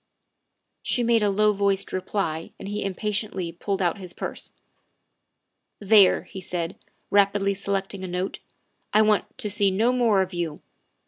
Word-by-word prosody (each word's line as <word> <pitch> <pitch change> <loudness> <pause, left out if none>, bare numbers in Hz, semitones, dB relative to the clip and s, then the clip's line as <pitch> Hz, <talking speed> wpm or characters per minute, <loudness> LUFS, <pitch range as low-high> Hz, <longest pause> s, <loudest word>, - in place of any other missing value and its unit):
She 245 - 0
made 230 -1 +3
a 205 - +3
low 210 +2 +3
voiced 200 -1 0
reply 180 -4 -2
and - - -8
he 205 +1 -3
impatiently 200 -2 -2
pulled 195 +3 -2
out 175 +3 0
his 180 -2 -7
purse. - - -6 0.7
" - - -53
There," 200 -3 +7
he 190 - -9
said, 175 -1 -3 0.4
rapidly 200 0 +3
selecting 195 0 -3
a - - -3
note, 180 +2 -3 0.3
" - - -46
I 215 - +7
want 215 -1 +1
to - - -1
see 205 -1 +2
no 220 +6 +2
more 225 -6 +3
of 185 0 -8
you. 170 -3 -4
195 Hz, 160 wpm, -25 LUFS, 185-210 Hz, 0.7 s, There